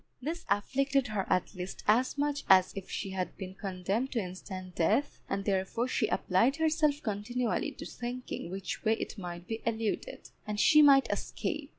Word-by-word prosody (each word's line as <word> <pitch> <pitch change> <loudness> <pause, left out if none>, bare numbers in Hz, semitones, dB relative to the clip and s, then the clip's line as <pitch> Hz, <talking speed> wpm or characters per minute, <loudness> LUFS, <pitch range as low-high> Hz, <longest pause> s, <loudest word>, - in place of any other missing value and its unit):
This 320 +7 -4
afflicted 265 +5 +1
her 205 -3 -2
at 180 - +1
least 180 0 -6
as 245 +6 +3
much 290 0 0
as 185 -1 +6
if 195 -1 -7
she 195 - -4
had 185 -1 -3
been 185 -1 -6
condemned 195 +6 -2
to 240 - +1
instant 185 -1 -6
death, 175 - +1
and 195 0 -2
therefore 200 +5 0
she 240 -3 +1
applied 225 +10 +2
herself 310 -2 +2
continually 225 +3 -1
to - - -8
thinking 245 -7 -5
which 190 0 -5
way 220 - +4
it 225 - -4
might 175 -1 -6
be 225 +3 -4
eluded, 230 - -3 0.2
and 210 0 -2
she 305 +7 +7
might 275 -2 +7
escape. 300 -4 -3
220 Hz, 175 wpm, -31 LUFS, 190-270 Hz, 0.2 s, she